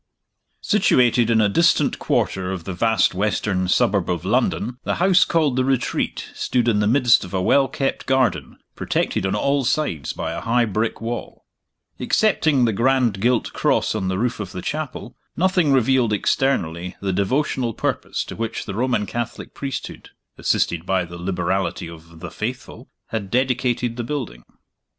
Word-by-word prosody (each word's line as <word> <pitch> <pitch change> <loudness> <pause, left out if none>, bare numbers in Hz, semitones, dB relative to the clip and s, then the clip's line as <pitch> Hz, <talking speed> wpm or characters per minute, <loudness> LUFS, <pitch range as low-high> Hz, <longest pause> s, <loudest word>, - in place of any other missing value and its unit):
SITUATED 120 -2 +3
in 115 -1 +3
a 105 - +4
distant 165 - +2
quarter 95 -1 -1
of 95 -3 -5
the 95 - -5
vast 110 +2 +2
western 95 -1 -1
suburb 90 - +2
of - - -2
London, 125 +3 0
the - - -1
house 185 0 +4
called 150 -6 +1
The 130 - +3
Retreat 130 -1 -1
stood 120 -2 0
in 110 -3 +3
the 105 - +2
midst 120 0 +4
of 95 +1 -7
a - - +1
well 135 +7 +4
kept 135 +1 -3
garden, 125 - 0 0.2
protected 95 - -1
on 95 - -1
all 140 +5 +1
sides 120 - -1
by - - -4
a - - -5
high 120 +1 +2
brick 110 +2 -2
wall. 120 +1 -6 0.5
Excepting 155 - +2
the 115 - +1
grand 120 -2 +2
gilt 120 +1 +1
cross - - +1
on 100 -4 -2
the 95 0 -1
roof 120 +2 -1
of 100 -3 -6
the 90 - -6
chapel, 130 -6 -5 0.2
nothing 180 -4 +2
revealed 130 -3 +3
externally 90 -7 0
the 95 -1 -2
devotional 120 +3 0
purpose - - -2
to - - -8
which 115 0 -4
the - - -5
Roman 120 -1 0
Catholic 120 +4 -5
priesthood 135 -1 -6 0.3
(assisted 85 -1 0
by 95 -1 0
the 85 0 -10
liberality 95 0 -2
of 85 0 -13
"the - - -7
Faithful") - - -6 0.2
had 105 -4 -4
dedicated 125 -1 0
the 120 - -2
building. 115 - -5
115 Hz, 165 wpm, -21 LUFS, 95-130 Hz, 0.5 s, a